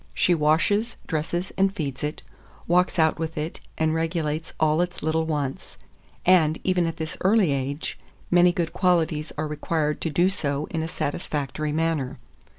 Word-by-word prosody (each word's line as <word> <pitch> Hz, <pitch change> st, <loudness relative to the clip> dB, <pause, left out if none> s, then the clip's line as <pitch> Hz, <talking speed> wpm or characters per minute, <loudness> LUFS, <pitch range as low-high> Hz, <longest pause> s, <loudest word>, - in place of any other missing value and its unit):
She 180 Hz, -, +3 dB
washes, 170 Hz, +9 st, +2 dB
dresses, 170 Hz, +4 st, -2 dB
and 195 Hz, 0 st, +4 dB
feeds 145 Hz, -9 st, -4 dB
it; 150 Hz, +1 st, -3 dB, 0.4 s
walks 180 Hz, +2 st, +3 dB
out 160 Hz, -1 st, +3 dB
with 160 Hz, -1 st, -3 dB
it, 155 Hz, +2 st, -3 dB, 0.2 s
and 160 Hz, 0 st, +2 dB
regulates 160 Hz, -1 st, -1 dB
all 155 Hz, +1 st, +3 dB
its 180 Hz, 0 st, -3 dB
little 160 Hz, +1 st, +1 dB
wants; 145 Hz, -4 st, -3 dB, 0.5 s
and, 165 Hz, -4 st, +5 dB
even 180 Hz, -2 st, +2 dB
at 165 Hz, -, -4 dB
this 160 Hz, -2 st, -4 dB
early 195 Hz, -4 st, +4 dB
age, 140 Hz, +2 st, -3 dB, 0.3 s
many 175 Hz, 0 st, +6 dB
good 170 Hz, -1 st, -2 dB
qualities 165 Hz, -4 st, +1 dB
are 155 Hz, -, -1 dB
required 150 Hz, 0 st, -1 dB
to 165 Hz, -, -1 dB
do 175 Hz, +4 st, +3 dB
so 145 Hz, -5 st, -1 dB
in 165 Hz, -, -1 dB
a 160 Hz, -, -2 dB
satisfactory 150 Hz, -2 st, -3 dB
manner. 160 Hz, -4 st, -1 dB
160 Hz, 160 wpm, -25 LUFS, 150-175 Hz, 0.5 s, many